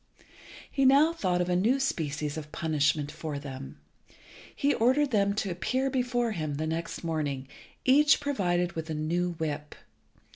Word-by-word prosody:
He 275 - +1
now 280 +5 +6
thought 180 - 0
of 175 - 0
a 180 - +1
new 230 +9 +2
species 150 - -2
of 150 -1 -7
punishment 150 -2 0
for 155 -3 -5
them. 135 -1 -8 0.8
He 285 +1 +2
ordered 260 +5 +2
them 200 -2 +2
to 200 -3 -1
appear 260 +10 -1
before 245 -2 0
him 155 -7 -3
next 160 +4 -3
morning, 145 -5 -2 0.4
each 285 +3 +5
provided 180 - 0
with 160 -1 -6
a 155 - -2
new 175 +3 -1
whip. 150 -2 -4
175 Hz, 150 wpm, -28 LUFS, 155-250 Hz, 0.8 s, now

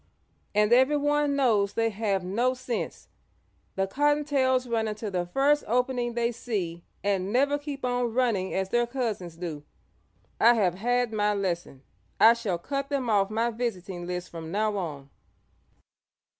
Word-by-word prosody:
"And 210 +2 +4
everyone 290 +2 +3
knows 220 -8 +2
they 225 0 +1
have 200 -3 -1
no 235 +8 0
sense. 255 -2 -4 0.7
The 195 - +1
Cottontails 280 +1 +1
run 230 -2 0
into 215 0 -4
the 175 -2 -1
first 280 +9 +2
opening 245 0 0
they 235 0 +1
see 190 -8 -4 0.2
and 195 -1 0
never 280 +4 +2
keep 285 -2 -5
on 245 -1 0
running 225 -6 +1
as 190 0 -1
their 240 +2 +2
cousins 225 -9 -3
do. 165 -4 -5 0.8
I 240 +1 +6
have 190 -6 +2
had 240 +4 0
my 210 -1 +1
lesson. 175 -8 -3 0.4
I 230 - +8
shall 225 -7 -2
cut 275 +10 -4
them 265 -5 -1
off 200 -2 +3
my 230 +2 0
visiting 195 -7 -4
list 180 0 -4
from 165 -1 -7
now 210 +2 0
on." 145 -7 -5
225 Hz, 150 wpm, -27 LUFS, 190-250 Hz, 0.8 s, I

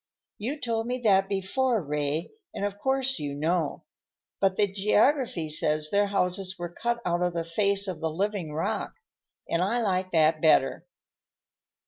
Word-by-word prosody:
"You 260 +8 -3
told 230 -3 -2
me 250 +1 -1
that 195 -3 +4
before, 220 +5 0
Ray, 150 0 -2 0.2
and 200 - -2
of 205 0 -4
course 265 +1 +1
you 145 -1 -4
know. 160 +1 -1 0.6
But 195 -1 +2
the 210 - +3
geography 210 - +1
says 155 0 0
their 205 0 +3
houses 190 -1 -1
were 175 -1 -6
cut 235 +3 -1
out 175 0 0
of 180 -1 +1
the 170 -1 -1
face 200 +4 +1
of 185 -3 -4
the 160 - -1
living 190 -1 -2
rock, 155 +2 -2 0.5
and 170 - 0
I 205 +6 +1
like 190 -4 0
that 155 -1 +3
better." 160 - +3
190 Hz, 160 wpm, -27 LUFS, 165-210 Hz, 0.6 s, that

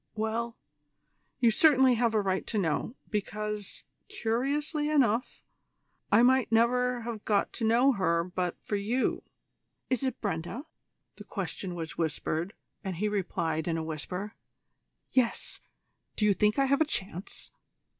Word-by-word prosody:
Well, 225 +2 -2 0.8
you 235 -2 +5
certainly 265 0 +6
have 235 -1 +1
a 215 - +4
right 190 -1 -1
to 220 - -2
know, 195 - 0 0.2
because, 210 0 -3 0.3
curiously 295 - 0
enough, 255 -5 +1 0.7
I 215 +3 +6
might 255 -2 +4
never 245 +2 +3
have 230 -2 -5
got 205 -2 +1
to 225 - -2
know 245 +5 +5
her 170 -7 +1
but 180 0 -3
for 205 - -1
you 230 +6 0 0.3
" - - -52
"Is 255 - +2
it 260 -3 -2
Brenda?" 200 - -3 0.5
The - - -9
question 180 -3 -4
was 165 -1 -6
whispered, 160 +3 -1 0.3
and 190 -3 -3
he 210 +6 0
replied 170 -6 -1
in 165 -1 0
a 160 - -2
whisper: 180 +6 -4 0.8
"Yes; 250 -3 0 0.5
do 210 - +1
you 205 - +5
think 210 +2 +2
I 275 - +4
have 280 +2 +2
any 315 - +4
chance?" 190 - -4
215 Hz, 145 wpm, -29 LUFS, 185-250 Hz, 0.8 s, certainly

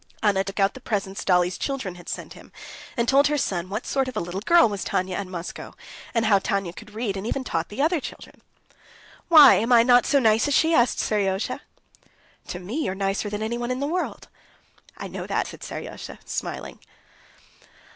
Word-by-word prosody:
Anna 200 -2 +3
took 195 +1 -6
out 195 0 +3
the - - -10
presents 195 -5 -3
Dolly's 180 0 +2
children 265 -10 -3
had 175 -1 -11
sent - - -6
him, - - -15 0.5
and 235 0 +1
told 275 +3 +5
her 295 0 0
son 185 -8 -2
what 210 +4 -4
sort 270 -1 0
of 255 - -6
little 175 +3 -3
girl 340 +6 +5
was 200 -2 -4
Tanya 185 0 -1
at 200 +1 -4
Moscow, 180 -1 -7 0.4
and 230 -1 +2
how 205 -2 +5
Tanya 195 -4 -2
could 215 +2 -13
read, 220 -3 -2
and 195 +3 -4
even 265 +2 -2
taught 165 -8 -2
the 255 +7 -2
other 330 +2 +2
children. - - -10 0.9
"Why, 315 -3 +9
am 230 +4 +1
I 235 -1 +7
not 245 0 +5
so 285 - +3
nice 225 -1 +3
as 285 - +1
she?" 325 +1 +3
asked 240 -5 +3
Seryozha. 195 -2 -1 0.9
"To - - -5
me 225 - -3
you're 190 - -2
nicer 195 +1 -1
than 210 +1 -4
anyone 240 +2 -3
in 255 0 -2
the 280 - -1
world." 350 +5 -3 0.7
"I - - -6
know - - -6
that," - - 0
said - - -10
Seryozha, - - -7
smiling. - - -5
215 Hz, 195 wpm, -24 LUFS, 195-255 Hz, 0.9 s, Why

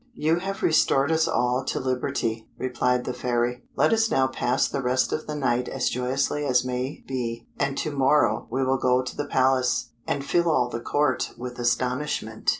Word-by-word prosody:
"You 160 -2 +1
have 195 +2 -5
restored 140 -2 +3
us 160 0 +2
all 125 +2 +1
to - - -1
liberty," 120 -3 -2
replied 125 0 0
the 125 - -2
Fairy; 120 0 -1
"let - - +3
us 225 0 +2
now 130 - +3
pass 130 0 0
the 140 - -3
rest 130 +1 +1
of 155 - -3
the 150 - -3
night 125 -3 0
as 130 -2 0
joyously 135 +4 -1
as 130 -3 +2
may 125 +3 -3
be, 120 -3 -4
and 140 -1 0
to 155 - -2
morrow 130 -5 +2
we 130 +3 0
will 130 0 +1
go 125 0 +2
to 130 - -6
the 145 - -3
Palace, 130 -3 +1 0.2
and 140 -1 -2
fill 170 +3 +2
all 125 -6 +2
the 115 - -4
Court 145 +1 0
with 125 0 -7
astonishment." 120 -1 -1
130 Hz, 190 wpm, -25 LUFS, 125-140 Hz, 0.2 s, restored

